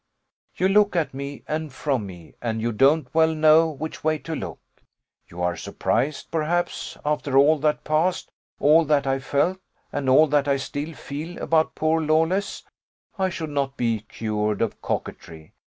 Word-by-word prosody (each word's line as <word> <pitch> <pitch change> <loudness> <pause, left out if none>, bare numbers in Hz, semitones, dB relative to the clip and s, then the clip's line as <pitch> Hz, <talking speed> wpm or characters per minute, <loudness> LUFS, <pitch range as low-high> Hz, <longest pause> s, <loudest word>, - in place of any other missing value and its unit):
You 185 - +2
look 205 0 +3
at 165 -5 0
me, 140 +1 -7
and 155 -1 -3
from 130 -5 -2
me, 90 -4 -12
and 115 -2 -2
you 115 +1 -1
don't 135 +5 +3
well 160 0 +3
know 155 +1 +5
which 155 +1 -7
way 155 0 +2
to 160 +2 -6
look. 95 - -6 0.7
You 90 +1 -6
are 90 0 0
surprised, 135 - -2
perhaps, 165 +2 -2
after 150 -2 0
all 150 +3 +5
that 150 +1 0
passed, 160 +4 0 0.3
all 155 +3 +5
that 145 -2 +2
I 135 0 0
felt, 145 +7 0 0.3
and 140 -2 -2
all 145 +5 +7
that 145 -1 +1
I 140 -1 +2
still 145 +4 -5
feel 155 +6 -7
about 160 -1 +1
poor 160 +1 +1
Lawless, 160 +6 0 0.6
I 190 0 +2
should 160 -4 -5
not 140 -1 -2
be 115 -2 0
cured 105 0 -2
of 115 - -4
coquetry. 80 -1 -6
150 Hz, 170 wpm, -24 LUFS, 130-160 Hz, 0.7 s, all